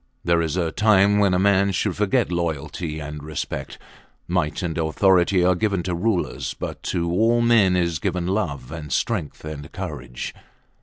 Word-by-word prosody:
There 85 Hz, -1 st, +2 dB
is 80 Hz, +1 st, -2 dB
a 85 Hz, -3 st, 0 dB
time 105 Hz, 0 st, +4 dB
when 100 Hz, -3 st, +3 dB
a -, -, +3 dB
man 100 Hz, +1 st, +3 dB
should 95 Hz, 0 st, 0 dB
forget 105 Hz, +2 st, +1 dB
loyalty 80 Hz, -1 st, -3 dB
and 75 Hz, 0 st, -6 dB
respect. 75 Hz, 0 st, -5 dB, 0.5 s
Might 85 Hz, -2 st, -1 dB
and 85 Hz, -3 st, -2 dB
authority 90 Hz, +2 st, +3 dB
are 90 Hz, -, +5 dB
given 100 Hz, -1 st, 0 dB
to 90 Hz, -, -2 dB
rulers, 90 Hz, +1 st, -1 dB
but -, -, -6 dB
to 85 Hz, -1 st, -1 dB
all 115 Hz, +6 st, +3 dB
men 115 Hz, -6 st, +4 dB
is 85 Hz, -3 st, 0 dB
given 90 Hz, -1 st, -1 dB
love 85 Hz, -9 st, -2 dB
and 75 Hz, -3 st, -7 dB
strength 85 Hz, -, -2 dB
and 75 Hz, -2 st, -7 dB
courage. -, -, -6 dB
90 Hz, 165 wpm, -23 LUFS, 80-100 Hz, 0.5 s, are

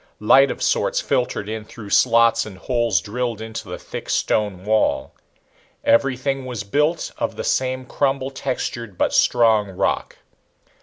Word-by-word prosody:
Light 135 Hz, +6 st, +5 dB
of -, -, -4 dB
sorts -, -, +1 dB
filtered 125 Hz, -, -1 dB
in 110 Hz, 0 st, -4 dB
through 105 Hz, -1 st, -11 dB
slots 115 Hz, -1 st, +4 dB
and 105 Hz, -3 st, -10 dB
holes 120 Hz, -1 st, 0 dB
drilled 115 Hz, +1 st, -3 dB
into 110 Hz, -2 st, -7 dB
the 90 Hz, -, -5 dB
thick -, -, -8 dB
stone 100 Hz, -3 st, 0 dB
wall. 105 Hz, -11 st, +1 dB, 0.7 s
Everything 135 Hz, +2 st, +1 dB
was 120 Hz, -5 st, -4 dB
built 150 Hz, +11 st, 0 dB
of -, -, -2 dB
the -, -, -5 dB
same 130 Hz, 0 st, -1 dB
crumble 135 Hz, 0 st, -1 dB
textured 120 Hz, -6 st, -4 dB
but -, -, +1 dB
strong 110 Hz, -4 st, +3 dB
rock. 95 Hz, -, -2 dB
115 Hz, 145 wpm, -21 LUFS, 105-130 Hz, 0.7 s, Light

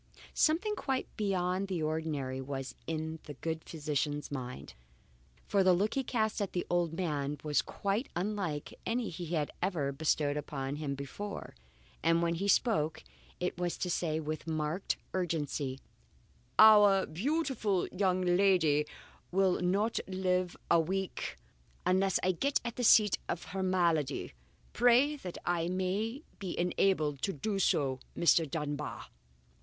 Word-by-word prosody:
Something 365 Hz, +8 st, +2 dB
quite 265 Hz, -8 st, -3 dB
beyond 190 Hz, -2 st, 0 dB
the 180 Hz, -4 st, -2 dB
ordinary 150 Hz, -4 st, -2 dB
was 135 Hz, -1 st, -5 dB
in 160 Hz, 0 st, -3 dB
the 145 Hz, -, -8 dB
good 160 Hz, +3 st, -3 dB
physician's 150 Hz, -2 st, -2 dB
mind, 125 Hz, -2 st, -6 dB, 0.7 s
for 200 Hz, -1 st, +2 dB
the 185 Hz, -1 st, +6 dB
look 200 Hz, +5 st, +1 dB
he 270 Hz, -, 0 dB
cast 220 Hz, -3 st, 0 dB
at 200 Hz, -, -2 dB
the 175 Hz, -, -1 dB
old 175 Hz, -2 st, +2 dB
man 150 Hz, -5 st, -2 dB
was 150 Hz, -4 st, +2 dB
quite 200 Hz, -, -2 dB
unlike 180 Hz, -5 st, -2 dB
any 235 Hz, -1 st, -1 dB
he 170 Hz, 0 st, -4 dB
had 150 Hz, -2 st, -1 dB
ever 170 Hz, -7 st, 0 dB
bestowed 145 Hz, 0 st, +1 dB
upon 140 Hz, -1 st, -4 dB
him 145 Hz, -2 st, -3 dB
before, 170 Hz, +9 st, -6 dB, 0.5 s
and 165 Hz, +1 st, +3 dB
when 170 Hz, 0 st, +1 dB
he 190 Hz, +4 st, -2 dB
spoke 180 Hz, -, +2 dB, 0.4 s
it 180 Hz, 0 st, -2 dB
was 175 Hz, -1 st, -1 dB
to 180 Hz, -, -2 dB
say 160 Hz, -2 st, 0 dB
with 155 Hz, +1 st, -4 dB
marked 160 Hz, +3 st, -1 dB, 0.2 s
urgency: 150 Hz, -6 st, -2 dB, 0.8 s
"Our 210 Hz, -3 st, +8 dB
beautiful 220 Hz, -, 0 dB
young 185 Hz, -1 st, +1 dB
lady 175 Hz, -5 st, +3 dB, 0.4 s
will 190 Hz, 0 st, +2 dB
not 200 Hz, +5 st, +1 dB
live 185 Hz, -1 st, 0 dB
a 170 Hz, -, +6 dB
week 190 Hz, +3 st, -2 dB, 0.5 s
unless 190 Hz, 0 st, +3 dB
I 185 Hz, -, +4 dB
get 275 Hz, +11 st, +1 dB
at 235 Hz, -, -3 dB
the 250 Hz, -, -2 dB
seat 215 Hz, -3 st, +6 dB
of 170 Hz, -, -2 dB
her 190 Hz, +1 st, -4 dB
malady. 170 Hz, -7 st, +1 dB, 0.4 s
Pray 245 Hz, +5 st, +5 dB
that 180 Hz, -10 st, -7 dB
I 170 Hz, -1 st, +1 dB
may 195 Hz, -, -1 dB, 0.2 s
be 190 Hz, -3 st, -4 dB
enabled 175 Hz, -5 st, +1 dB
to 195 Hz, -, 0 dB
do 195 Hz, +7 st, -2 dB
so, 135 Hz, -7 st, +2 dB, 0.2 s
Mr. 165 Hz, -2 st, +4 dB
Dunbar." 150 Hz, -1 st, -4 dB
175 Hz, 145 wpm, -32 LUFS, 150-195 Hz, 0.8 s, Our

